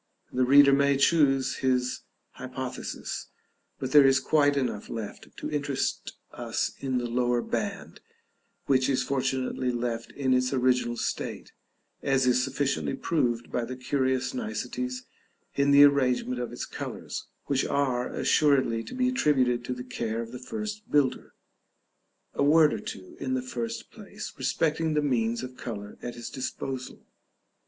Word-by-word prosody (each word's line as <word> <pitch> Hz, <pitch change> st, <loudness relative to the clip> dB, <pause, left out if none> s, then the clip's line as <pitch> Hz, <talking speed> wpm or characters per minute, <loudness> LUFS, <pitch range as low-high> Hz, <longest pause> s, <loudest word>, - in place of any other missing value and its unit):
The 130 Hz, 0 st, +2 dB
reader 140 Hz, +1 st, +7 dB
may 140 Hz, 0 st, +4 dB
choose 135 Hz, -3 st, +3 dB
his 125 Hz, -1 st, 0 dB, 0.3 s
hypothesis; -, -, -5 dB, 0.5 s
but 130 Hz, -1 st, -4 dB
there 145 Hz, -2 st, +8 dB
is 135 Hz, 0 st, +5 dB
quite 145 Hz, +1 st, +3 dB
enough 120 Hz, -6 st, -2 dB
left 110 Hz, -2 st, -6 dB
to -, -, -5 dB
interest 140 Hz, -2 st, -2 dB
us -, -, -2 dB
in 130 Hz, -2 st, -1 dB
the 120 Hz, -, -1 dB
lower 120 Hz, 0 st, +1 dB
band, -, -, -4 dB, 0.7 s
which 130 Hz, -1 st, +3 dB
is 135 Hz, -, +2 dB
fortunately 130 Hz, -1 st, -1 dB
left 120 Hz, -1 st, -3 dB
in 130 Hz, -2 st, +1 dB
its 125 Hz, +1 st, +2 dB
original 125 Hz, -2 st, +2 dB
state, -, -, -3 dB, 0.5 s
as 135 Hz, -1 st, +2 dB
is 125 Hz, 0 st, +3 dB
sufficiently 135 Hz, +1 st, -1 dB
proved 120 Hz, -7 st, -1 dB
by 125 Hz, -, -1 dB
the 125 Hz, +2 st, -5 dB
curious 130 Hz, -, 0 dB
niceties 255 Hz, +1 st, -4 dB, 0.5 s
in 140 Hz, 0 st, +2 dB
the 140 Hz, 0 st, +8 dB
arrangement 125 Hz, -3 st, +3 dB
of 120 Hz, -, -4 dB
its -, -, -5 dB
colors, -, -, -6 dB, 0.2 s
which 135 Hz, -1 st, +1 dB
are 130 Hz, -3 st, 0 dB
assuredly 130 Hz, -6 st, +2 dB
to -, -, -8 dB
be 255 Hz, 0 st, +2 dB
attributed 130 Hz, -, +2 dB
to 125 Hz, -, -2 dB
the 125 Hz, -, -6 dB
care 115 Hz, -3 st, -3 dB
of 115 Hz, 0 st, -5 dB
the 125 Hz, -, -7 dB
first 215 Hz, -, -6 dB
builder. 135 Hz, -3 st, +1 dB, 1.0 s
A -, -, -2 dB
word 150 Hz, +2 st, +5 dB
or -, -, -3 dB
two, 95 Hz, -2 st, -8 dB
in 130 Hz, -1 st, -1 dB
the 130 Hz, -, -2 dB
first 115 Hz, -2 st, -5 dB
place, -, -, -8 dB
respecting 160 Hz, 0 st, 0 dB
the 150 Hz, -, +2 dB
means 120 Hz, -3 st, 0 dB
of 130 Hz, 0 st, -8 dB
color 105 Hz, -4 st, -7 dB
at 120 Hz, -1 st, -5 dB
his 120 Hz, -1 st, -7 dB
disposal. 130 Hz, 0 st, -5 dB
130 Hz, 150 wpm, -27 LUFS, 125-140 Hz, 1.0 s, there